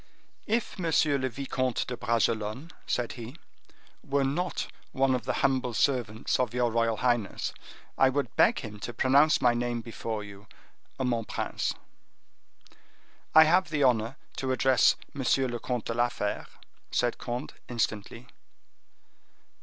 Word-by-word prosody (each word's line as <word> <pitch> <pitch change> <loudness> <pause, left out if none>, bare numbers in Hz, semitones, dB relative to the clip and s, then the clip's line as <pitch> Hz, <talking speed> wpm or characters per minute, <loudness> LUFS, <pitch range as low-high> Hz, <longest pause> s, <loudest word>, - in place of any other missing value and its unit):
"If 225 -2 -1
M. 180 - -2
le 145 -4 +2
Vicomte 130 -1 -2
de 125 - -4
Bragelonne," 115 +4 -1 0.2
said 120 -1 -1
he, 120 +2 -8 0.7
"were 140 0 +1
not 160 +5 -1 0.3
one 135 0 +2
of 125 - -2
the - - 0
humble 130 -3 +1
servants 120 -6 +1
of 125 -1 0
your 120 -1 +2
royal 115 -1 +1
highness, 120 -5 0 0.5
I 135 - +6
would 130 -3 -2
beg - - +4
him 105 -1 -8
to 120 +2 -6
pronounce 140 +5 +4
my 120 -1 +5
name 120 0 -1
before 115 -2 -5
you—mon 110 +4 -6
prince." - - -2 1.6
"I 160 - +11
have 175 +4 +3
the 155 -3 +1
honor 120 0 +2 0.2
to 130 -1 -1
address 130 -2 +4 0.2
Monsieur 135 -1 +1
le 120 -1 -4
Comte 125 -1 -3
de 115 - -2
la 120 +1 +2
Fere," 105 -3 -3 0.4
said 120 -1 0
Conde, 120 0 -4 0.2
instantly. 115 0 -2
125 Hz, 140 wpm, -28 LUFS, 115-135 Hz, 1.6 s, I